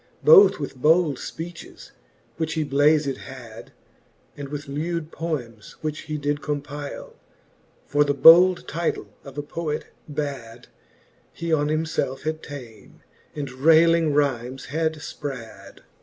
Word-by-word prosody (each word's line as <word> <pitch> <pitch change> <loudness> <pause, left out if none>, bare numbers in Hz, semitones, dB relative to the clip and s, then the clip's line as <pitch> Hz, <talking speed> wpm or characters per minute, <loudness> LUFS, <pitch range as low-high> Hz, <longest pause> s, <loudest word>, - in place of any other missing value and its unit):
Both 445 -3 +8
with 140 -2 -6
bold 155 +3 +3 0.2
{peaches, 170 +1 -9 0.5
which 160 -1 -2
he 160 - 0
blazed 145 -1 +2
had, 120 -5 -11 0.6
And 140 -1 -7
with 145 0 -6
lewd 160 +3 -3
poems, 120 -10 -5
which 155 -1 -3
he 155 - -2
did 145 0 -2
compyle 145 -1 -5 0.4
\ - - -36
For 145 +1 +4
the 145 -1 0
bold 175 +5 +7
title 170 0 -3
of 140 -1 -12
a 145 - -3
Poet 150 0 -4 0.2
bad 140 -6 -6 0.6
He 170 -1 -3
on 150 -1 +2
himfelfe 155 -4 -2
had 155 +1 -3
ta'en, 120 -8 -11 0.3
and 140 -3 -5
rayling 160 +4 +4
rymes 135 -3 -1
had 160 0 0
fprad. 140 -5 -8
150 Hz, 130 wpm, -24 LUFS, 140-160 Hz, 0.6 s, Both